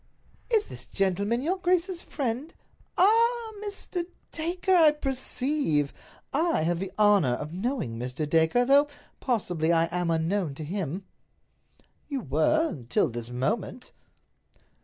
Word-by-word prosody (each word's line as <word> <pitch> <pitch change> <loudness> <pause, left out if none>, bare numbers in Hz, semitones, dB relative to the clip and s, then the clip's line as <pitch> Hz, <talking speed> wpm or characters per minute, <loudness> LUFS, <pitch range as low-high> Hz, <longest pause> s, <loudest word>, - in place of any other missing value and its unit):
"Is 440 -3 +3
this - - -8
gentleman 200 +5 0
your 360 +5 0
grace's 365 -1 0
friend? 265 +3 -4 0.4
Ah—Mr. 425 -3 +1 0.2
Dacre, 350 +4 -1
I 325 -3 +7
perceive! 265 - 0 0.4
I 320 - +2
have 170 +1 0
the 190 0 -4
honor 205 -11 +4
of 150 +5 -6
knowing 190 - -3
Mr. 125 +5 -3
Dacre, 160 +10 +3
though, 280 +3 +5 0.3
possibly, 180 - 0
I 165 -1 +4
am 175 -1 0
unknown 165 -1 0
to 155 - -6
him." 185 +2 -4 1.0
"You 275 -3 -2
were—until 155 - +1
this 120 0 -4
moment." 190 - -3
225 Hz, 115 wpm, -27 LUFS, -, 1.0 s, I